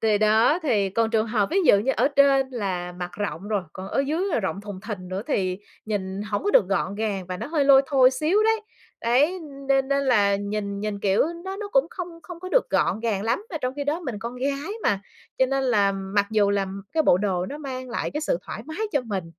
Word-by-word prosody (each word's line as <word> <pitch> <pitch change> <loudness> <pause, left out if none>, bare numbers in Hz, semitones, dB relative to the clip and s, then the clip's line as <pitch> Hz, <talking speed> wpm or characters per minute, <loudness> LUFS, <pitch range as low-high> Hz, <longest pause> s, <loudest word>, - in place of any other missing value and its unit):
Kỳ 215 -2 +2
đó 220 +8 +4
thì 210 -10 +1
còn 225 +3 +1
trường 220 -1 +1
hợp 215 -3 +1
ví 360 - 0
dụ 200 - +7
như 265 +6 +1
ở - - +3
trên 275 -1 +4
là 185 -7 -3
mặc 180 0 -6
rộng 200 -1 -4
rồi, 205 -3 0
còn 190 +1 -7
ở 275 - 0
dứ 330 +5 0
là 290 - +1
rộng 190 -1 -3
thùng 205 -2 -8
thình 200 -4 -6
nữa 190 +2 -3
thì 185 -9 0 0.3
nhìn 195 -1 -3
hổng 210 -1 -3
có 410 - +2
được 195 - +5
gọn 195 0 0
gàng 205 -4 -2
và 185 0 -4
nó - - -5
hơi 300 -2 +1
lôi 275 -1 +7
thôi 260 -2 +5
xíu 310 +10 +2
đấy, 445 0 +3 0.4
đấy, 285 +11 +2 0.3
nên 270 0 +3
nên 280 0 +1
là 205 -6 +3
nhìn 200 0 -3
nhìn, 210 -1 -3
kiểu, 195 -1 +3 0.2
nó 385 +1 -4
nó 415 0 -5
cũng 270 +3 +4
không 360 -1 -5
không 355 -2 -10
có 370 - -6
được - - +2
gọn 215 - +1
gàng 215 -4 -1
lắm, 235 - -1
mà 340 - -3
trong 255 +1 -2
khi 285 - -2
đó 300 +4 -1
mình 250 -11 -5
con 235 +2 -6
gái 280 +7 -2
mà. 200 -1 +1 0.4
Cho 260 - +4
nên 270 +1 0
là 205 -6 +3
mặc 195 +1 -1
dù 210 -2 +3
là 200 -1 +1 0.3
cái 320 -1 +2
bộ 180 - +4
đồ 185 -3 -1
nó 290 +9 -6
mang 255 -3 -6
lại 235 - -2
cái 300 - -3
sự - - 0
thoải - - -7
mái 315 - -7
cho 285 - +2
mình, 200 -6 -3
225 Hz, 250 wpm, -24 LUFS, 200-280 Hz, 0.4 s, dụ